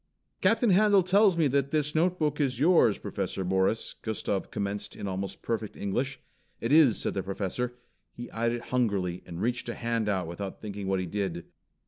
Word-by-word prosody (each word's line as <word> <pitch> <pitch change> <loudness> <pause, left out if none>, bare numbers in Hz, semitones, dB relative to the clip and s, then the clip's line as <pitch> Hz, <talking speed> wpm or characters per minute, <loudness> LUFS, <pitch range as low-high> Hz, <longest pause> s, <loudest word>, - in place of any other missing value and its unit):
"Captain 225 +3 +3
Handel 200 0 +5
tells 195 0 +4
me 165 - +3
that 140 0 +1
this 150 -1 0
notebook 160 -2 +1
is 130 -4 0
yours, 150 - +5
Professor 95 - -3
Morris," 95 +4 0
Gustav 105 -3 -2
commenced 100 0 -4
in 100 - -5
almost 95 0 -4
perfect 110 -2 -3
English. 130 +7 -2 0.4
"It 115 - -2
is," 145 -8 +6
said - - -1
the 95 - -1
Professor. 100 +6 -3 0.4
He 120 0 -8
eyed 115 +1 0
it 120 0 -4
hungrily, 100 -8 0
and 85 -1 -7
reached 120 +3 -1
a - - -3
hand 115 -2 -1
out 95 -3 0
without 95 +4 -6
thinking 100 -2 -6
what 95 -1 +1
he 95 - -2
did. 90 -2 -3
115 Hz, 180 wpm, -28 LUFS, 100-145 Hz, 0.4 s, is